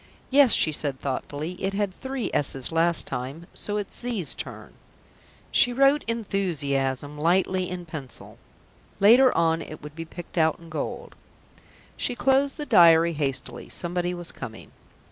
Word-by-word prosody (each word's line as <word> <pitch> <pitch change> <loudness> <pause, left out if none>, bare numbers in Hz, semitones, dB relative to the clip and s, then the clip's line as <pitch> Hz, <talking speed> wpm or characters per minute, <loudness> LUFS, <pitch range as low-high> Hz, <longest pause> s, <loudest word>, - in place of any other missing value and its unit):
"Yes," 275 -3 +6
she 155 - +3
said 145 -3 -2
thoughtfully. 145 +4 -4
"It 195 +1 -1
had 200 -2 -1
three 265 +2 -4
's's' 135 -2 +1
last 165 0 +2
time, 135 +7 -5
so 205 0 -3
it's 205 -2 -4
'z's' 235 -9 0
turn." - - -8 0.8
She 245 - +4
wrote 275 +4 +3
"enthuzziazm" 150 - -2
lightly 185 +3 +1
in 180 -1 -6
pencil; 150 -6 -9 0.6
later 245 +6 +7
on 165 0 +2
it 155 - -9
would 150 0 -10
be 165 0 -6
picked 175 +1 -7
out 160 -1 +3
in 165 -1 -15
gold. 155 -2 -5 0.8
She 245 - -2
closed 270 +4 +2
the 300 - -4
diary 170 - +6
hastily. 135 -4 -3
Somebody 175 0 -2
was 175 -1 -6
coming. 110 -1 -9
170 Hz, 145 wpm, -25 LUFS, 150-205 Hz, 0.8 s, later